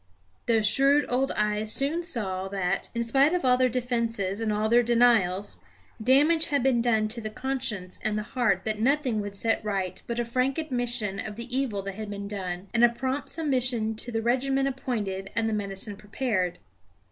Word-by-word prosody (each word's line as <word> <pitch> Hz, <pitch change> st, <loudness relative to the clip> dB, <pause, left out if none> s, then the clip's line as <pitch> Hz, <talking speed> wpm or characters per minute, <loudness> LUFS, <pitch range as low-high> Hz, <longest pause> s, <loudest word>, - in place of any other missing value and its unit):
Those 225 Hz, -2 st, +3 dB
shrewd 275 Hz, +7 st, +5 dB
old 265 Hz, +2 st, +1 dB
eyes 210 Hz, 0 st, 0 dB
soon 290 Hz, +8 st, 0 dB
saw 200 Hz, -, -2 dB
that, 195 Hz, -1 st, -2 dB
in 235 Hz, -, 0 dB
spite 270 Hz, +7 st, +3 dB
of 360 Hz, -6 st, 0 dB
all 250 Hz, -1 st, +5 dB
their 255 Hz, 0 st, +2 dB
defences 230 Hz, -5 st, -1 dB
and 220 Hz, -1 st, 0 dB
all 210 Hz, +1 st, 0 dB
their 235 Hz, +2 st, +5 dB
denials, 230 Hz, -5 st, +2 dB, 0.4 s
damage 295 Hz, +7 st, +4 dB
had 285 Hz, -4 st, 0 dB
been 255 Hz, -3 st, +3 dB
done 220 Hz, -2 st, +2 dB
to 230 Hz, +2 st, -5 dB
the 215 Hz, -, -4 dB
conscience 235 Hz, -6 st, -3 dB
and 215 Hz, -1 st, 0 dB
the 210 Hz, -, -2 dB
heart 220 Hz, -5 st, 0 dB
that 215 Hz, -1 st, -2 dB
nothing 255 Hz, -2 st, +1 dB
would 205 Hz, -1 st, -6 dB
set 225 Hz, +3 st, 0 dB
right 195 Hz, -3 st, -3 dB
but 235 Hz, 0 st, -3 dB
a 240 Hz, -, 0 dB
frank 255 Hz, +3 st, 0 dB
admission 245 Hz, -9 st, -2 dB
of 210 Hz, 0 st, -5 dB
the 235 Hz, +2 st, -6 dB
evil 235 Hz, -8 st, -1 dB
that 195 Hz, 0 st, -5 dB
had 215 Hz, +1 st, -7 dB
been 200 Hz, 0 st, -5 dB
done, 190 Hz, -2 st, -5 dB
and 235 Hz, 0 st, +3 dB
a 240 Hz, -, +8 dB
prompt 260 Hz, +4 st, -3 dB
submission 250 Hz, -7 st, +1 dB
to 240 Hz, -, -7 dB
the 225 Hz, -1 st, -2 dB
regimen 270 Hz, +3 st, +1 dB
appointed 215 Hz, -8 st, -3 dB
and 230 Hz, -1 st, +1 dB
the 220 Hz, -, -1 dB
medicine 200 Hz, 0 st, -4 dB
prepared. 205 Hz, -4 st, -2 dB
230 Hz, 195 wpm, -27 LUFS, 205-255 Hz, 0.4 s, a